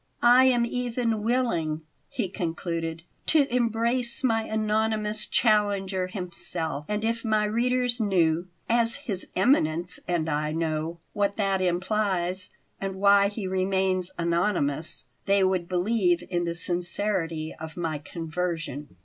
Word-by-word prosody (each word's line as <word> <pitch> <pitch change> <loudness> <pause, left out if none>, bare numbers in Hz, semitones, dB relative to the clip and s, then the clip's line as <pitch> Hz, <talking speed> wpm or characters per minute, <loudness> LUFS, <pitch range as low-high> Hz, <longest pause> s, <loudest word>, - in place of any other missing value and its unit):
"I 245 +2 +7
am 245 -2 +4
even 235 -2 -1
willing," 210 -10 0 0.3
he 230 -6 -2
concluded; 165 -3 -3 0.2
"to 305 -3 +5
embrace 235 +1 0
my 225 -3 +3
anonymous 215 0 0
challenger 200 -4 +2
himself; 175 -5 -4
and 210 +1 -2
if 230 +1 -1
my 215 -2 +2
readers 245 +2 +1
knew, 175 -5 +2 0.2
as 230 0 +2
his 195 -5 -1
Eminence 175 - +2
and 170 -3 0
I 150 0 -1
know, 160 0 -2 0.2
what 200 -1 0
that 195 -2 +1
implies 185 0 0 0.3
and 195 -1 -3
why 200 +1 +5
he 205 0 -5
remains 185 -1 0
anonymous, 170 -3 0 0.2
they 200 0 +4
would 185 -2 +1
believe 180 -1 +2
in 175 -1 0
the 170 0 -2
sincerity 175 -2 -1
of 160 +1 -8
my 160 -3 -2
conversion." 165 - -4
190 Hz, 125 wpm, -26 LUFS, 170-220 Hz, 0.3 s, I